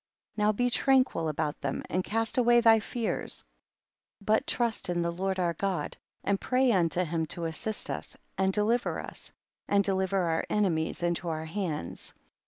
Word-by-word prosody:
56. - - -41
Now 210 0 +4
be 245 +4 +1
tranquil 255 -12 +3
about 150 0 -2
them 140 -1 -2
and 185 +1 -1
cast 225 +5 0
away 240 0 +5
thy 225 -1 +6
fears, 230 +1 -3 0.7
but 220 +6 +1
trust 235 -5 0
in 175 -1 0
the 170 - 0
Lord 190 +2 -2
our 175 -2 +1
God, 180 -3 -2 0.3
and 200 0 0
pray 255 0 +3
unto 180 -3 +2
him 165 -1 -1
to 170 +2 -3
assist 165 +7 -3
us - - -6 0.2
and 190 0 +2
deliver 220 +4 +1
us, - - -8 0.4
and 200 0 +3
deli 190 -1 +1
ver 195 -1 +1
our 165 -1 0
enemies 175 -6 0
into 175 0 0
our 160 0 -3
hands. 160 - -4
190 Hz, 175 wpm, -29 LUFS, 170-220 Hz, 0.7 s, thy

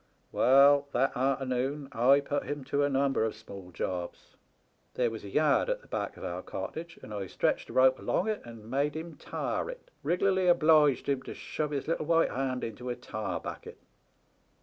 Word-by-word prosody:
"Well, 140 +2 +5
that 135 +3 +1
artemoon 135 +1 -1
I 135 +3 +4
put 145 0 -2
him 145 -1 -4
to 140 +2 0
a 145 - +2
number 135 -3 +1
of 110 -1 -1
small 100 -4 -11
jobs. 90 0 -5 0.6
There 120 -2 +1
was 110 - -7
a 100 - -7
yard 150 - +2
at - - -2
the - - -18
back - - -4
of - - -10
our - - -4
cottage, 170 +1 -6
and 105 - -8
I 100 -2 -4
stretched - - -1
a - - -8
rope 130 0 +5
along 185 - 0
it 215 -1 -1
and 115 -2 -11
made 140 +5 0
him 165 +1 -6
tar - - -3
it, - - -10
rig'larly 185 +1 +2
obliged 155 -5 +4
him 140 -2 0
to - - -8
shove 150 -1 -3
his 140 -2 -3
little 160 -2 -1
white 165 0 +3
hand 130 -1 -2
into 120 +3 -5
a 120 - -2
tar 100 -8 -4
bucket. - - -8
135 Hz, 195 wpm, -30 LUFS, 120-155 Hz, 0.6 s, Well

